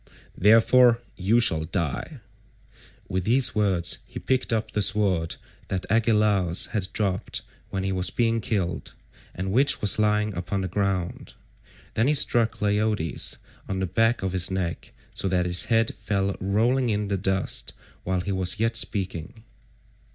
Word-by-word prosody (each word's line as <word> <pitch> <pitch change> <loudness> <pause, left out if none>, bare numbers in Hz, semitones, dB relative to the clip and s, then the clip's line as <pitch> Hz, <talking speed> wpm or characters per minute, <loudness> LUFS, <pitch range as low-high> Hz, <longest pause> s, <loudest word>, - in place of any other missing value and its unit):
Therefore 115 +3 +5 0.2
you 105 +5 +2
shall 80 -9 +2
die." 80 -3 -4 0.9
With 95 -1 -2
these 125 +5 +2
words 95 -5 +2
he - - -9
picked 130 -1 -1
up 110 -1 -1
the 105 - -1
sword 100 -5 +1 0.3
that 95 -1 -3
Agelaus 105 -5 +2
had 100 -4 -1
dropped 95 -3 -2 0.3
when 95 -1 -3
he 95 - -1
was 90 -1 +1
being 115 -1 0
killed, 90 -8 -3 0.4
and 95 +2 -3
which 135 +7 +3
was 105 +1 +2
lying 105 -1 +1
upon 90 +3 -3
the 95 - -2
ground. 95 -1 -2 0.6
Then 115 +3 +1
he 150 - +4
struck 120 -4 +2
Leiodes 105 -5 +1 0.3
on 95 - -2
the 95 - 0
back 115 +4 +1
of 95 - -1
his 90 -1 +2
neck, 90 -3 -4 0.2
so - - -1
that 90 -1 +1
his 90 0 +1
head 115 -1 +1
fell 100 -1 -2
rolling 115 +6 +1
in 105 -1 -1
the 100 - 0
dust 95 0 -2 0.3
while 95 0 -1
he 90 - -4
was 95 +1 0
yet 115 +1 +1
speaking. 95 +2 -3
100 Hz, 155 wpm, -25 LUFS, 95-110 Hz, 0.9 s, Therefore